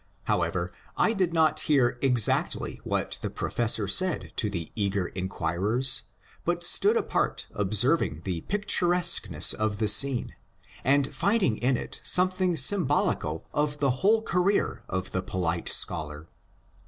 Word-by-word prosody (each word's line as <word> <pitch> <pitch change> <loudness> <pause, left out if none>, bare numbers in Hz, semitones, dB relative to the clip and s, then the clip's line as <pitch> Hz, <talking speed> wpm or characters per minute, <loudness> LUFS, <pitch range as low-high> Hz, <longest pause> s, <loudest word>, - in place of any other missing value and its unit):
However, - - -2 0.2
I 225 - +2
did 185 -5 -1
not 160 -2 +2
hear 125 -5 +1
exactly 125 -5 +1
what - - -3
the - - -4
professor 110 -3 -1
said 185 - +1
to 105 - +1
the 85 -5 -6
eager 100 -3 -2
inquirers, 95 +7 0 0.4
but 175 0 -2
stood 415 - +4
apart - - -2
observing 105 - 0
the 90 -4 -4
picturesqueness 175 - +2
of 110 -1 -2
the 110 0 -1
scene, 125 +4 +2 0.5
and 140 +1 +1
finding 200 - 0
in 125 +1 0
it - - -7
something 185 -1 +3
symbolical 145 - +1
of 145 0 -1
the 135 -3 0
whole 220 +3 +3
career 185 +1 -1
of 95 0 -4
the 95 - -1
polite 90 -3 -3
scholar. 75 +1 +1
125 Hz, 130 wpm, -26 LUFS, -, 0.5 s, stood